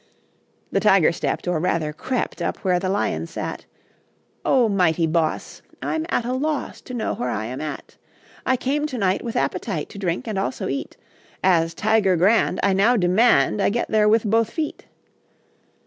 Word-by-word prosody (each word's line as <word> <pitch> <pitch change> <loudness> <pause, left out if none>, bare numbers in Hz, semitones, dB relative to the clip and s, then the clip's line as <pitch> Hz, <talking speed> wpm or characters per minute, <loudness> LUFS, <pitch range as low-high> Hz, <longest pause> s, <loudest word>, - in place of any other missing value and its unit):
The - - +2
Tiger 195 -6 +5
stepped, 170 - -3
Or, 175 -3 +1
rather, 160 -2 -1
crept, 255 +10 -3
Up - - -1
where 180 -1 +3
the 185 0 -2
Lion 85 - -1
sat. - - -6 0.8
"O, 250 -3 +3
mighty 180 -5 +2
boss 160 0 -1 0.2
I'm 320 0 -2
at 245 - 0
a 250 - -1
loss 295 +2 -2
To 250 - -8
know 230 - -1
where 125 - -3
I 110 -2 -2
am 125 +3 -5
at. 155 -1 -7 0.5
I 260 - +2
came 290 +4 -1
to 260 -4 -5
night 195 -3 0
With 230 - -5
appetite 165 +4 -2
To 200 - -10
drink 180 +2 -2
and 210 -3 -2
also 130 -8 -2
eat; 135 - -4 0.5
As 165 -3 +3
a - - -31
Tiger 215 -3 +2
grand, 200 +7 +3
I 200 - +3
now 220 +6 +4
demand, 180 - +3
I - - +3
get 235 +4 -2
there 215 -1 +3
with 220 +1 +4
both 225 +1 +2
feet." 315 -2 -4
195 Hz, 180 wpm, -22 LUFS, 165-230 Hz, 0.8 s, Tiger